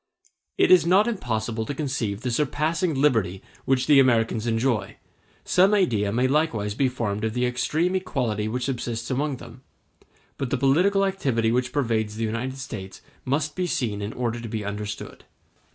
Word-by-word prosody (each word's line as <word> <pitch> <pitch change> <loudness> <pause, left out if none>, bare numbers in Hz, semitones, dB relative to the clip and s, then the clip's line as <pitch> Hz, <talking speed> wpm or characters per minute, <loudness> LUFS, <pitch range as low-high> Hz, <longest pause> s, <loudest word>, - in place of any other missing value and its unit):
It 390 - +4
is 185 - +8
not 190 +6 +4
impossible 115 - -2
to 140 +6 -5
conceive 125 -8 -2
the 125 - -2
surpassing 155 +5 0
liberty 110 -10 +1 0.2
which 130 -1 +2
the 145 -2 +6
Americans 115 -3 +2
enjoy; 115 -1 0 0.5
some 190 +3 +4
idea 110 - +1
may 125 +4 +2
likewise 130 -8 0
be 130 +4 +1
formed 105 -4 -3
of 110 +1 -1
the 125 0 +1
extreme 155 +8 0
equality 110 - -1
which 125 +3 -2
subsists 120 -2 -3
amongst 135 0 -1
them, 120 +1 -12 0.8
but 135 - -2
the - - 0
political 185 +9 +3
activity 130 -13 0
which 125 +1 0
pervades 110 -6 0
the 115 - -3
United 120 +4 -3
States 100 -8 -8 0.2
must 145 +3 -1
be 180 -1 -1
seen 110 -10 -2
in 100 +1 -3
order 120 -1 -2
to 115 - -6
be 110 -2 -4
understood. 105 0 -6
125 Hz, 170 wpm, -24 LUFS, 110-150 Hz, 0.8 s, is